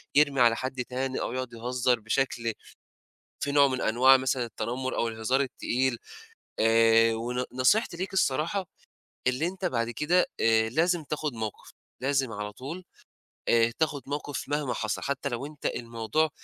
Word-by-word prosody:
يرمي 145 -2 +4
على 120 -1 +6
حد 130 0 -3
تاني 130 +1 -3
أو - - -3
يقعُد 130 -1 -4
يهزّر 125 +1 0
بشكل 115 +1 -1 0.9
فيه 145 - -1
نوع 140 -1 +6
من 130 -1 -2
أنواع 130 +4 +6
مثلًا 130 -1 0
التنمُّر 125 +3 -3
أو 115 - 0
الهزار 115 +4 0
التقيل 130 -1 -1 0.6
آآ 115 0 +5
ون 120 +3 -2
نصيحتي 150 - +2
ليك 190 +3 -4
الصراحة، 180 +2 0 0.6
اللي 130 +6 +1
أنت 190 +1 -5
بعد 115 -8 0
كده 155 +8 +2
آآ 110 0 +3
لازم 165 +6 +1
تاخُد 150 -1 -3
موقِف، 110 -2 -6 0.3
لازم 135 -2 +1
على 105 -1 -5
طول 150 - -7 0.6
آآ 115 0 +4
تاخُد 150 -3 0
موقف 145 0 -4
مهما 145 -3 -1
حصل 110 -1 -2
حتّى 140 0 -2
لو 120 +3 -4
أنت 150 -1 -7
الموضوع 115 +6 -1
130 Hz, 155 wpm, -28 LUFS, 115-145 Hz, 0.9 s, على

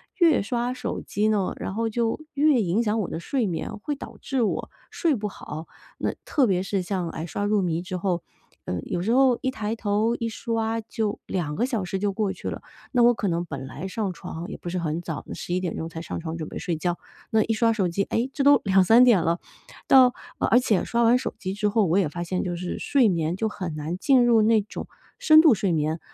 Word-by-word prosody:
越 335 -6 +4
刷 240 +4 -1
手 250 -1 -4
机 210 +1 -1
呢， 205 -3 0
然 - - -4
后 225 +2 -1
就 230 0 -1
越 285 -3 +3
影 195 +4 +1
响 220 0 0
我 200 - -2
的 - - -4
睡 250 +3 -1
眠， 175 +3 -3
会 295 +6 -3
导 - - -10
致 270 -3 -1
我 215 - -1 0.2
睡 325 -4 +1
不 210 -2 -3
好。 160 -4 -8 0.3
那 - - -1
特 280 -5 +2
别 185 -4 +1
是 195 0 -1
像， 180 -2 -2
哎， 160 0 -5
刷 190 +5 -3
入 210 -1 +2
迷 170 -2 -1
之 185 0 -5
后， 175 -1 -1 0.4
嗯， 90 - -3
有 175 - -2
时 215 +6 0
候 260 -1 +4
一 260 - 0
抬 220 -3 -3
头 220 +1 0
一 230 -1 -3
刷 225 0 -2
就 220 -1 -3
2 155 -5 -2
个 240 - +1
小 230 -7 -2
时 190 +2 -3
就 205 0 0
过 205 -1 0
去 - - -6
了， - - -6 0.3
那 245 -2 +3
我 240 +1 +6
可 210 - -2
能 170 0 -1
本 135 -5 -6
来 165 +7 -6
上 200 -1 -2
床 165 +1 -7
也 - - -6
不 175 - -7
是 180 - -3
很 165 0 -2
早， 160 -4 -5
11 180 +1 -2
点 180 -3 -3
钟 160 - -3
才 165 0 -7
上 170 - -5
床 165 0 -5
准 155 -2 -5
备 - - -7
睡 175 -2 -2
觉， 175 +2 -1 0.3
那 220 -1 +4
一 225 - 0
刷 230 +1 +3
手 200 -5 +1
机， 175 +4 0
哎， 235 +6 -1
这 280 - -1
都 285 -1 +6
2、3 195 +5 +6
点 235 -8 +5
了， 165 +2 0 0.5
到 255 -2 +7 0.3
呃 - - +1
而 245 - +5
且 220 -6 +1
刷 235 0 +1
完 235 +2 +5
手 250 - -4
机 190 -3 -4
之 210 +1 0
后， 215 0 +2
我 175 +2 +2
也 190 - +3
发 175 +3 -5
现 180 +2 -2
就 175 -2 -3
是 175 +1 -4
睡 265 -6 +3
眠 165 -2 0
就 220 +3 -1
很 180 -6 -5
难 155 +4 -4
进 255 +3 +4
入 230 -2 +5
那 220 0 +4
种 210 - -8 0.3
深 310 0 +7
度 315 -6 +6
睡 195 -1 0
眠， 155 0 0
205 Hz, 255 characters per minute, -25 LUFS, 175-235 Hz, 0.5 s, 到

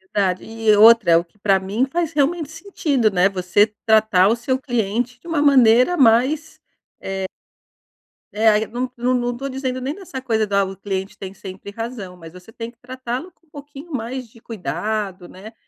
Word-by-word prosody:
Verdade. 185 -3 +1
E, 225 -1 +2
outra 225 -3 +7
é 165 - +7
o 170 - +1
que 175 +4 -33
pra 195 -2 +2
mim 200 +7 -1
faz 335 -1 -1
realmente 300 +2 0
sentido, 320 - 0
né, 185 0 +3
você 195 +2 +2 0.2
tratar 215 -4 +4
o 225 - +3
seu 255 +2 -2
cliente 245 -1 -2
de - - -16
uma 330 -3 0
maneira 255 +2 +5
mais, 270 +6 +2 0.5
eh 190 0 -3 1.1
É, 220 +2 +4
aí 215 0 +2
não 250 +2 -4
não 245 +2 0
não 245 -1 -1
tô 275 +2 -4
dizendo 260 -1 -3
nem 265 +4 -4
dessa 355 -9 -8
coisa 225 -4 0
da 200 -1 +1
"o 190 0 -7
cliente 195 0 -5
tem 190 -1 -8
sempre 195 +1 -10
razão", 215 -5 -7
mas 165 -1 -12
você 180 +4 -14
tem 230 0 -7
que 235 - -20
tratá-lo 255 +6 -6
com 335 - -38
um - - -36
pouquinho 290 +2 -11
mais 250 +1 -4
de 225 +1 -20
cuidado, 210 -3 -4
né, 210 +5 -12
230 Hz, 190 wpm, -20 LUFS, 200-260 Hz, 1.1 s, outra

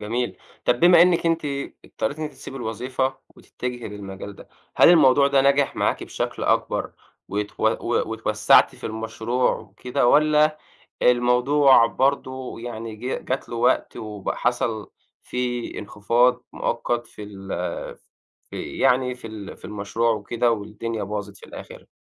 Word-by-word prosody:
جميل، 120 +4 -2 0.3
طَب 120 0 +2
بما 175 -1 +8
أنِك 175 -1 +3
أنتِ 165 -1 +1 0.4
اضطريتي 145 - -4
إن 155 - -2
أنتِ 150 - -6
تسيبي 135 0 -10
الوظيفة، 130 +3 -2 0.2
وتتجهي 125 -2 -6
للمجال 100 -1 -8
ده، - - -14 0.3
هل - - +7
الموضوع 140 -5 +6
ده 140 -1 +4
نجح 140 0 +2
معاكِ - - 0
بشكل - - -4
أكبر - - 0 0.4
وتو 105 +1 -1
و - - -1
واتوسعّتِ - - +3
في - - -14
المشروع 110 +3 -1
وكده؟ 125 -1 -2
والّا 155 +2 +4 0.4
الموضوع 125 +1 +5
برضو 130 -1 -1
يعني 115 -2 -6
جـه 125 +4 -3
جات 130 +1 -4
له 120 - -5
وقت 120 +1 +1
وب 105 -3 -5
حصل 115 -3 -1 0.3
فيه 120 -1 -3
انخفاض 115 +4 +1
مؤقت 120 0 -2
في - - -12
ال 100 -2 -10 1.0
في - - -6
يعني 125 -1 +2
في 125 - -11
ال 105 -3 -8
في - - -21
المشروع 105 +3 -1
وكده 115 +3 0
والدنيا 110 +1 -4
باظت 100 0 -5
في - - -14
الآخر؟ - - -11
120 Hz, 140 wpm, -23 LUFS, 110-130 Hz, 1.0 s, بما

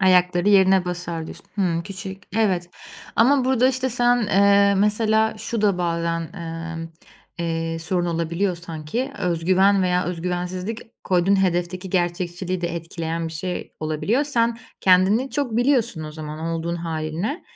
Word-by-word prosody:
Ayakları 180 0 +4
yerine 190 -2 +5
basar, 175 -2 -4
diyorsun. - - -11
Hıı. 175 -5 0
Küçük, 195 +1 -8
evet. 185 -6 +1 0.5
Ama 260 +3 +4
burada 260 0 +3
işte 260 0 -1
sen, 245 0 +3
eee, 200 0 +5
mesela, 220 +1 +2
şu 230 -2 -3
da 200 -4 +3
bazen, 170 -1 -1
emm, 165 -2 -6 0.5
eee, 165 -1 -2
sorun 175 +2 -1
olabiliyor 170 +3 -1
sanki: 170 - -4
Öz 170 -2 -1
güven 190 +2 +4
veya 180 0 +1
öz 175 -2 -4
güvensizlik 180 +4 -3 0.2
koyduğun 190 +2 +3
hedefteki 180 +1 -1
gerçekçiliği 175 0 -1
de 170 -1 -2
etkileyen 165 0 -4
bir - - -9
şey 180 +3 -4
olabiliyor. 155 - 0
Sen 235 -4 +1 0.2
kendini 195 +8 +4
çok 260 -6 -1
biliyorsun 240 - +1
o 155 - -7
zaman 155 -1 -7
olduğun 165 +1 -2
hâlinle 165 - -3
180 Hz, 145 wpm, -23 LUFS, 170-205 Hz, 0.5 s, yerine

